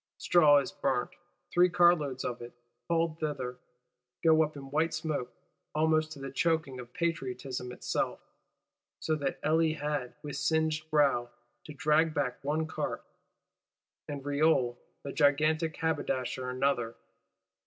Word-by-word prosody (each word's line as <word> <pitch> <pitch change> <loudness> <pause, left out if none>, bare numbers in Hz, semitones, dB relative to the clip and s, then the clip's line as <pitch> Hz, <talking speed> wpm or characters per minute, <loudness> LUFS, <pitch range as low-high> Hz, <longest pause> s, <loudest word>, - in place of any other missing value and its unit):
Straw 155 -4 +5
is 140 - 0
burnt; - - -1 0.4
three 180 +1 +5
cartloads 170 -7 +3
of 120 0 -3
it, 120 0 -9 0.4
hauled 165 -1 +1
thither, 130 -5 -3 0.6
go 160 -1 +6
up 155 -1 0
in 135 -1 -9
white 160 +2 +1
smoke: 155 -5 -3 0.4
almost 155 0 +2
to 145 - -11
the 135 -1 -6
choking 155 -3 0
of 125 -1 -9
Patriotism 130 -6 -3
itself; - - -2 0.8
so 160 - -1
that 140 -2 -2
Elie 160 0 +3
had, 150 -4 -3
with 145 -1 -5
singed 155 +1 0
brows, 140 -6 +3 0.4
to 150 - -9
drag 155 +2 +2
back 135 -3 -2
one 155 +3 0
cart; 160 - -4 1.0
and 140 -2 -6
Reole 145 -4 +2 0.3
the 140 - -5
"gigantic 155 +2 +2
haberdasher" 130 -5 -1
another. 125 -3 0
150 Hz, 130 wpm, -30 LUFS, 135-160 Hz, 1.0 s, go